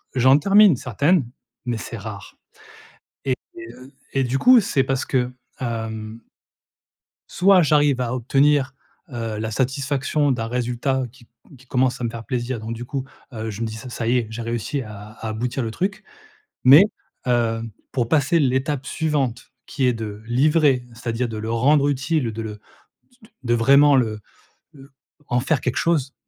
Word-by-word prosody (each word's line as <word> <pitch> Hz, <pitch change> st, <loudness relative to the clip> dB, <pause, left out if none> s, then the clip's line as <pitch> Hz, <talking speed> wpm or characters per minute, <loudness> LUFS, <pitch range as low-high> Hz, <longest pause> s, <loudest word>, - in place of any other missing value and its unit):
j'en 130 Hz, +2 st, +5 dB
termine 200 Hz, +1 st, +6 dB
certaines, 140 Hz, -, +1 dB, 0.4 s
mais 120 Hz, -2 st, -2 dB
c'est 115 Hz, -, -7 dB
rare. 105 Hz, -1 st, -8 dB, 0.9 s
Et 130 Hz, -2 st, 0 dB, 0.2 s
heu, 120 Hz, +4 st, -11 dB, 0.2 s
et 135 Hz, -, +2 dB
du 125 Hz, +2 st, 0 dB
coup 250 Hz, 0 st, +7 dB
c'est 140 Hz, -, +1 dB
parce 135 Hz, -1 st, -1 dB
que, 125 Hz, -1 st, 0 dB, 0.3 s
hem 110 Hz, -2 st, -5 dB, 1.1 s
soit 185 Hz, 0 st, +5 dB
j'arrive 145 Hz, -3 st, +3 dB
à 120 Hz, 0 st, -2 dB
obtenir, 135 Hz, +2 st, +2 dB, 0.3 s
heu, 115 Hz, -4 st, -4 dB
la 110 Hz, 0 st, -3 dB
satisfaction 135 Hz, +4 st, 0 dB
d'un 115 Hz, -3 st, -2 dB
résultat 125 Hz, +2 st, -1 dB
qui 130 Hz, -1 st, -19 dB
c -, -, -23 dB, 0.3 s
qui 130 Hz, -, -20 dB
commence 130 Hz, 0 st, 0 dB
à 120 Hz, -, -2 dB
me -, -, -1 dB
faire 115 Hz, 0 st, -8 dB
plaisir 125 Hz, -1 st, -3 dB
donc, 110 Hz, +1 st, -5 dB
du 120 Hz, +2 st, -7 dB
coup, 135 Hz, +1 st, -4 dB, 0.3 s
heu, 110 Hz, 0 st, -4 dB
je 105 Hz, +2 st, -7 dB
me -, -, 0 dB
dis 110 Hz, -, -6 dB
ça 120 Hz, +3 st, -8 dB
ça 115 Hz, -1 st, -4 dB
y 125 Hz, +2 st, +3 dB
est 115 Hz, -, -4 dB
j'ai 115 Hz, +1 st, -6 dB
réussi 120 Hz, +5 st, -3 dB
à 105 Hz, -1 st, -10 dB
à 110 Hz, -, -3 dB
aboutir 120 Hz, +4 st, -2 dB
le 110 Hz, -, -3 dB
truc 190 Hz, -, -3 dB, 0.6 s
mais, 140 Hz, +9 st, +9 dB, 0.4 s
hem, 115 Hz, -2 st, 0 dB, 0.2 s
pour 120 Hz, -3 st, -1 dB
passer 155 Hz, +3 st, +3 dB
l'étape 135 Hz, 0 st, 0 dB
suivante 145 Hz, -7 st, -2 dB
qui 135 Hz, -3 st, -1 dB
est 125 Hz, -, +3 dB
de 110 Hz, -2 st, -6 dB
livrer, 135 Hz, +1 st, +3 dB
c'est-à-dire 120 Hz, +1 st, -3 dB
de 110 Hz, -, -5 dB
le 110 Hz, +1 st, -4 dB
rendre 140 Hz, +5 st, +3 dB
utile, 135 Hz, -2 st, -1 dB
de 115 Hz, -, -5 dB
le 110 Hz, -, -5 dB, 0.6 s
s 245 Hz, -, -29 dB
t 220 Hz, -, -19 dB
de 120 Hz, -1 st, +1 dB
vraiment 140 Hz, +5 st, +5 dB
le, 110 Hz, -5 st, 0 dB, 0.5 s
heu 135 Hz, 0 st, -15 dB, 0.4 s
en 120 Hz, 0 st, +1 dB
faire 150 Hz, -1 st, 0 dB
quelque 125 Hz, -, -2 dB
chose, 150 Hz, -5 st, 0 dB
125 Hz, 175 wpm, -22 LUFS, 115-140 Hz, 1.1 s, mais